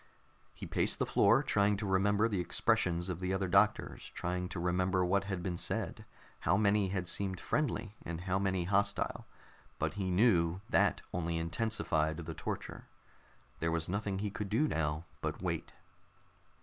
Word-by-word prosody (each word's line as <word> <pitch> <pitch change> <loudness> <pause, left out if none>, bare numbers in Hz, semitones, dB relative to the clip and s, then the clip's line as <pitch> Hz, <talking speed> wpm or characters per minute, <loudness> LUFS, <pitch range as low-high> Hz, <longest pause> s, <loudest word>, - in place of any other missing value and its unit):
He - - -7
paced - - +1
the - - 0
floor, 115 +7 +4
trying 105 -6 +2
to 105 - -3
remember 100 +3 +3
the 105 -5 -1
expressions 90 -1 +1
of 90 -2 -3
the 90 0 -2
other 95 0 0
doctors, 100 +4 +2
trying 90 +1 -2
to 90 - -5
remember 90 +1 +1
what 100 +2 +1
had 95 -3 -3
been 90 -2 -2
said, - - -2 0.3
how 95 - +2
many 100 -1 +3
had 90 -2 -2
seemed 95 -1 -1
friendly 115 -8 -1
and 85 0 -5
how 95 +1 0
many 95 -2 0
hostile, 100 +3 0 0.5
but - - -1
he 95 -2 -2
knew 90 -3 +3
that - - +2
only 85 -1 -1
intensified 80 -3 0
the 80 -1 -5
torture. - - -5 0.7
There 85 0 0
was 80 0 0
nothing 100 +1 -2
he 105 +1 -2
could 105 -1 -4
do 130 +10 +2
now 75 - -1 0.2
but - - -3
wait. - - -3
95 Hz, 165 wpm, -33 LUFS, 85-100 Hz, 0.7 s, floor